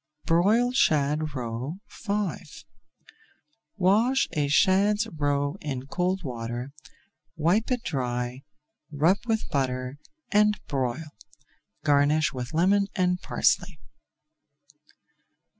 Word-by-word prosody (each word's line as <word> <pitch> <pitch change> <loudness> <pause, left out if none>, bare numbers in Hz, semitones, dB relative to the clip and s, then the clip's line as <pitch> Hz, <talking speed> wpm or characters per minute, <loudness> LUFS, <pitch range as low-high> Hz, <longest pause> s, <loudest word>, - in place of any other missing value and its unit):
BROILED 220 +9 +3
SHAD 150 - +2
ROE 125 +7 -4
V 205 -2 -3 1.3
Wash 220 +8 +3
a 145 -2 0
shad's 200 +7 +3
roe 145 -1 0
in 135 -3 -4
cold 180 +5 -1
water, 120 0 -5 0.6
wipe 175 +8 +1
it 250 -2 -1
dry, 125 - -3 0.5
rub 160 +7 +3
with 220 -1 0
butter, 130 0 -2 0.3
and 210 0 +3
broil. 140 +3 -2 0.7
Garnish 150 +1 +3
with 125 -1 -5
lemon 195 +5 +3
and 180 -1 +1
parsley. 175 -4 +1
155 Hz, 90 wpm, -26 LUFS, 135-195 Hz, 1.3 s, BROILED